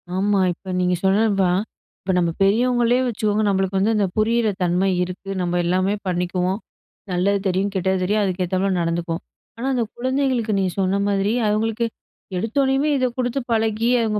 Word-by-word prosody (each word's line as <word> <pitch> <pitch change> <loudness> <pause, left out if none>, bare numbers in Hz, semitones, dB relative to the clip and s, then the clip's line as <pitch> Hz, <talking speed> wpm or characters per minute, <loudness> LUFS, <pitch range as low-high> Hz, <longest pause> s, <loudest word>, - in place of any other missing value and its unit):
ஆமா. 200 +1 +2
இப்ப 185 +2 -9
நீங்க 180 0 +2
சொன்னது 205 +3 +3
தான். 180 +2 +2 0.4
இப்ப, 190 - -1
நம்ப 170 -2 +2
பெரியவங்களே 240 +4 +3
வச்சுக்கோங்க 215 -2 0
நம்பளுக்கு 195 -1 +1
வந்து 215 +4 +2
அந்த 210 -2 +2
புரியிற 225 +1 +2 0.2
தன்மை 180 +2 +2
இருக்கு. 185 +2 -7
நம்ப 175 0 -1
எல்லாமே 185 +3 +1
பண்ணிக்குவோம். 180 +2 -1 0.5
நல்லது 195 +3 +1
தெரியும், 190 +2 0
கெட்டது 190 0 +1
தெரியும் 210 +3 +1
அதுக்கேத்தாப்ல 185 0 0
நடந்துக்குவோம். 170 0 -2 0.3
ஆனா, 245 +3 -3
அந்த 245 -2 +1
குழந்தைகளுக்கு 255 -3 0
நீங்க 190 -1 0
சொன்ன 190 +1 +1
மாதிரி, 200 +1 +1
அவங்களுக்கு 220 +2 0 0.5
எடுத்தோனேயுமே 270 +7 +1
இத 255 - +1
குடுத்து 250 +1 -1
பழகி 225 0 +1
அவங்க 215 -2 0
200 Hz, 150 wpm, -22 LUFS, 185-225 Hz, 0.5 s, சொன்னது